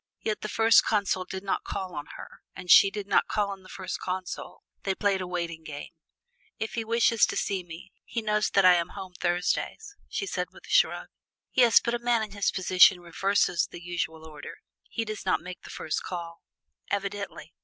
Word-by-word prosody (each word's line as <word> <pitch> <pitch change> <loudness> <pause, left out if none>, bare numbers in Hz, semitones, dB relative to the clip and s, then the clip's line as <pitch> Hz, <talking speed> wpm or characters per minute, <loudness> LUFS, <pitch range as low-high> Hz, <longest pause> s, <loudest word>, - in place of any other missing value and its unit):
Yet 215 -1 -2
the - - -3
First 225 +1 +5
Consul 200 -3 0
did 190 +1 -6
not 195 - -1
call 185 -2 -5
on 145 0 -6
her, - - -11
and 180 -1 -2
she 195 - +9
did 205 0 -5
not 200 - +2
call 205 -2 0
on 195 -1 -8
the 185 - -16
First 190 -1 -5
Consul. 185 0 -5 0.2
They 195 -1 -1
played 195 -1 +1
a 185 - -4
waiting 170 -2 -4
game, 150 -2 -8 0.7
"If 220 - -4
he 230 - -2
wishes 230 0 +3
to - - -3
see 195 -3 -1
me, 175 +2 -11
he 230 - -4
knows 210 0 +1
that 195 -1 +3
I 180 - +9
am 170 -1 0
home 185 -1 -7
Thursdays!" 180 - -1
she 395 - -2
said - - -2
with - - -15
a - - -16
shrug. - - +3 0.4
"Yes, 240 -3 +6
but 235 - -2
a 240 - 0
man 235 -2 +2
in 215 - -6
his 200 -1 0
position 185 0 +5
reverses 175 0 +1
the - - -9
usual 170 -2 -4
order: 150 -2 -10 0.3
he 225 - -3
does 215 -1 -5
not 185 - +2
make 180 0 -9
the - - -12
first 155 - -3
call!" 170 -2 -6 0.5
"Evidently!" 200 0 -4
190 Hz, 205 wpm, -27 LUFS, 175-210 Hz, 0.7 s, she